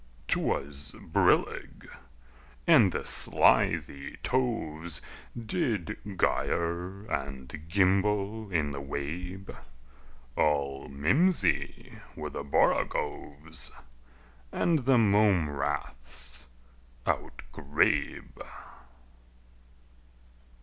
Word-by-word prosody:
'Twas 70 +1 -2
brillig, - - +1 0.8
and - - +6
the - - -3
slithy 70 0 +2
toves 85 - -1 0.4
Did 110 - -1 0.2
gyre 90 +4 0
and 70 - -5
gimble 100 +3 +1
in 75 -4 +1
the 70 0 -5
wabe; 90 +8 -5 0.8
All 70 -2 +1
mimsy 130 - +1 0.2
were - - -5
the - - -4
borogoves, 70 0 -1 0.8
And 160 -7 +1
the 135 -1 +5
mome 100 -7 +4
raths 65 -3 -3 0.6
outgrabe. 70 +2 -1
80 Hz, 65 wpm, -29 LUFS, 70-100 Hz, 0.8 s, and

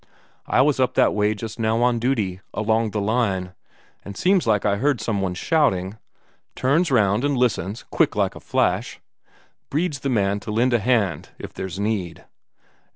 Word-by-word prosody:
"I - - +3
was 140 0 +2
up 130 - +1
that - - +4
way 105 +1 +1
just 110 +3 -7
now 115 +1 +1
on 120 -1 +2
duty, 110 -7 -1
along 110 +1 +1
the 105 - -3
line, 100 -4 -1 0.5
and 100 -1 -9
seems 185 -6 +2
like 105 -3 +2
I 100 -1 +2
heard 140 +2 +1
some 105 -4 -2
one 90 -2 -2
shouting. 105 - 0 0.6
Turns 150 +7 +2
round 105 -3 +2
and 145 -2 +1
listens 110 -4 -1
quick - - +1
as - - +2
a - - -10
flash - - -1 0.7
Brede's 150 -1 -1
the 140 - -2
man 100 -4 +1
to 105 - -10
lend 120 +4 +1
a 120 - +3
hand 105 - 0
if - - -9
there's 95 +1 -6
need. 100 -6 -3
110 Hz, 175 wpm, -22 LUFS, 100-125 Hz, 0.7 s, that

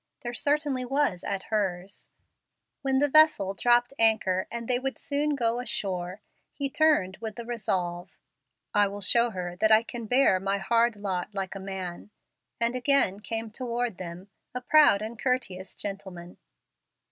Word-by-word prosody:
There 240 0 -5
certainly 285 0 0
was 265 -8 0
at 195 -1 -3
hers. 195 -2 -2 0.7
When 270 -1 +1
the 290 +2 +3
vessel 300 -10 +4
dropped 240 +6 +2
anchor 215 -5 +2
and 235 -1 -6
they 245 -1 +2
would 265 +1 -3
soon 295 -1 -1
go 235 -2 0
ashore, 190 -6 -3 0.3
he 275 -1 -3
turned 290 - +2
with 220 -2 -6
the 235 - -7
resolve, 180 -7 -3 0.6
"I 205 0 +4
will 200 +1 -7
show 235 +5 +6
her 180 -4 -5
that 220 +3 +2
I 220 +1 +6
can 235 -1 -7
bear 250 -6 +3
my 195 +1 -1
hard 230 +3 +1
lot 200 0 -4
like 190 -1 -3
a 195 - -7
man," 190 -1 -6 0.5
and 235 +1 0
again 250 -6 +2
came 225 +1 -5
toward 240 -2 -3
them, 180 +2 -8 0.2
a 250 - -3
proud 250 -6 +5
and 220 +1 -7
courteous 240 -8 -2
gentleman. 190 -3 -7
220 Hz, 160 wpm, -27 LUFS, 190-250 Hz, 0.7 s, show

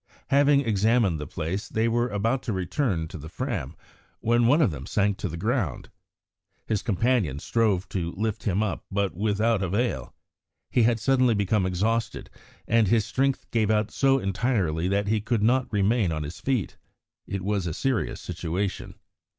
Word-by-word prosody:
Having 140 0 +4
examined 110 - +2
the 75 - -5
place, 85 +6 -4
they 110 +1 +1
were 120 +1 +1
about 115 +5 0
to 110 - -3
return 95 - -1
to 85 0 -9
the 80 +3 -9
Fram, - - -4 0.4
when 120 +1 +2
one 145 +6 +5
of 140 - +3
them 70 -3 -7
sank 100 -1 +1
to 95 - -2
the 85 - -6
ground. 105 - -2 0.7
His 110 -3 -1
companion 105 - +1
strove 105 +2 0
to 85 -3 -2
lift 110 0 -2
him 100 +1 0
up, 105 - -3
but 100 0 -1
without 105 +2 +1
avail; 95 - -1 0.6
he 125 - +3
had 115 0 +3
suddenly 130 -2 +3
become 100 -1 +1
exhausted, 110 +6 -1 0.4
and 115 -2 +3
his 110 +1 +3
strength 135 0 0
gave 110 -3 +1
out 105 -1 +1
so 135 -1 +3
entirely 95 -6 0
that 100 +1 0
he 110 0 +1
could 110 0 0
not 125 +3 +2
remain 105 -2 +2
on 75 -1 -2
his 75 +3 -7
feet. 130 -9 -1 0.5
It 100 -1 -4
was 100 -2 -1
a - - -2
serious 130 -5 -1
situation. 90 +3 -4
105 Hz, 170 wpm, -26 LUFS, 95-115 Hz, 0.7 s, one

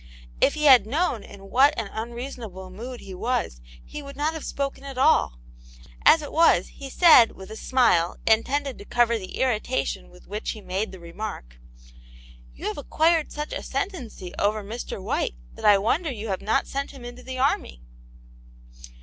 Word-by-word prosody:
If 280 - +4
he 305 - -3
had 260 -7 +7
known 280 - 0
in 195 -1 -13
what 280 +4 +5
an 225 - -1
unreasonable 225 -5 -6
mood 240 +6 -8
he 195 - -9
was, 185 - -2 0.2
he 300 - -7
would 280 -1 -10
not 300 +3 0
have 320 - -6
spoken 275 -1 -4
at 275 -2 -8
all; 260 - +3 0.7
as 315 -1 +7
it 290 - -7
was, 320 - +4
he 275 - -9
said, 285 -6 +7
with 190 +2 -11
a - - -6
smile, 220 -9 +2
intended 265 +5 +1
to 200 - -10
cover 235 0 +2
the 185 - -8
irritation 210 - -1
with - - -18
which - - -4
he - - -10
made 195 +4 -3
the 190 - -10
remark: 170 - -7 1.0
"You - - -9
have 215 - -3
acquired 320 +2 +2
such 300 0 -5
ascendancy 255 - -5
over 210 +1 +1
Mr. 220 +1 -6
White, 185 - -2 0.2
that - - -8
I 205 -1 +7
wonder 290 - 0
you 220 -2 -6
have 190 - -2
not 215 - +1
sent 275 0 -4
him 265 -3 -11
into 245 +1 -9
the 260 0 -7
army." 65 - 0
235 Hz, 175 wpm, -25 LUFS, 195-280 Hz, 1.0 s, had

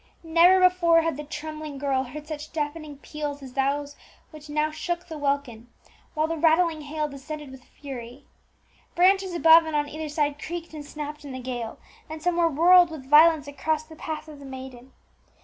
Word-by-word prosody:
Never 340 +3 +5
before 350 -3 +4
had 330 -3 -1
the 295 - -6
trembling 305 0 -7
girl 270 -1 0
heard 295 +4 -9
such 310 0 -7
deafening 300 -1 -4
peals 290 -1 -6
as 260 -2 -10
those 280 +2 -1 0.4
which 305 -2 -12
now 305 +1 0
shook 345 +3 -4
the 325 - -7
welkin, 280 -5 -2 0.5
while 310 0 +2
the 330 +1 -3
rattling 325 0 +3
hail 300 +1 -3
descended 290 0 -8
with 265 -1 -13
fury. 260 -1 -10 0.7
Branches 380 0 +3
above 330 -1 +7
and 315 - -3
on 295 0 +1
either 310 +1 -6
side 295 -1 -1
creaked 335 0 -6
and 300 -1 -7
snapped 300 0 -7
in 280 -2 -8
the 260 - -6
gale, 245 -3 -5 0.3
and 315 0 -6
some 345 +2 0
were 335 -1 +3
whirled 350 +3 +6
with 300 -5 -9
violence 310 -1 +6
across 305 +2 -2
the 315 0 -14
path 315 0 -6
of 300 -2 -11
the 280 - -11
maiden. 260 -1 -10
300 Hz, 185 wpm, -25 LUFS, 280-325 Hz, 0.7 s, above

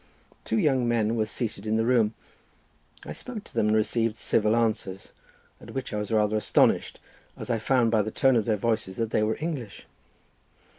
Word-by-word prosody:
Two - - -1
young 135 - +2
men 115 -1 +1
were 110 -2 0
seated 110 -1 -4
in 110 +1 +1
the 115 - +1
room. 115 -3 +2 0.9
I - - -6
spoke 235 -5 -6
to - - -13
them 105 - +1
and 105 - +3
received 115 +1 0
civil 110 0 +2
answers, 105 -5 -2 0.5
at - - -12
which 135 -4 -4
I 105 - -1
was 105 0 -5
rather 110 -1 +2
astonished, 105 - +2 0.4
as - - -4
I 115 - 0
found 115 +1 +2
by 110 -2 +3
the 105 - -3
tone 130 +4 +3
of 110 -3 +2
their 110 -2 +1
voices 110 -3 -1
that 115 -1 -2
they - - +2
were 110 +1 0
English. 145 -10 -5
110 Hz, 195 wpm, -26 LUFS, 105-120 Hz, 0.9 s, and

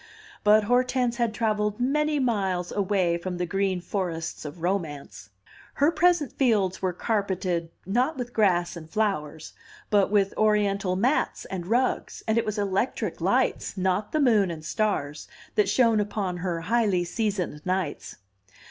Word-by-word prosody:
But 210 +1 +5
Hortense 245 +1 +1
had 235 -2 +1
travelled 210 -1 -1
many 300 +4 +1
miles 195 -9 0
away 185 -4 +1
from 180 0 -4
the 180 - -1
green 195 0 0
forests 175 -4 -4
of 160 +3 -8
romance; 160 - -3 0.5
her 290 +3 +3
present 345 -5 +2
fields 210 -8 +1
were 185 -1 +1
carpeted, 185 -4 -1 0.2
not 250 - 0
with 245 -1 -5
grass 175 -5 +2
and 160 -2 -10
flowers, 160 -7 -2 0.4
but 205 -2 +4
with 200 -1 +2
Oriental 200 -3 +2
mats 245 +10 0
and 180 -2 -5
rugs, 245 +5 0
and 220 - +2
it - - -1
was 215 0 -2
electric 200 +4 -1
lights, - - 0
not 190 +3 0
the 310 - 0
moon 220 -9 +4
and 160 -2 -7
stars, 155 -7 -2 0.3
that 420 -2 +2
shone 230 -4 +3
upon 200 -3 -2
her 175 -2 -3
highly 200 -1 +1
seasoned 180 -4 -2
nights. 185 -5 -3
200 Hz, 150 wpm, -26 LUFS, 180-230 Hz, 0.5 s, But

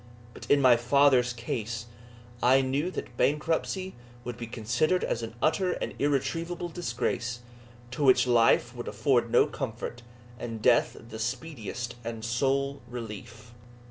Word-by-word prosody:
But - - -11
in 145 -1 +4
my 125 -2 +7
father's 125 0 +4
case, 115 -1 -4 0.6
I 130 +2 +5
knew 135 +6 0
that 125 -9 -6
bankruptcy 165 +5 0 0.3
would 125 0 -5
be 120 -1 -7
considered 125 +10 0
as 115 - -1
an 115 0 -6
utter 180 +3 +2
and - - -4
irretrievable 165 +5 -1
disgrace, 120 -6 -2 0.5
to 145 - -3
which 130 -1 +6
life 120 0 +3
would 120 - -6
afford 115 +2 +1
no 120 - +5
comfort, 120 -2 -5 0.4
and 115 -2 -5
death - - +3
the 110 -1 -10
speediest 120 -1 -4
and 115 -1 -5
sole 140 +3 0
relief. 115 -1 -8
125 Hz, 140 wpm, -28 LUFS, 115-140 Hz, 0.6 s, my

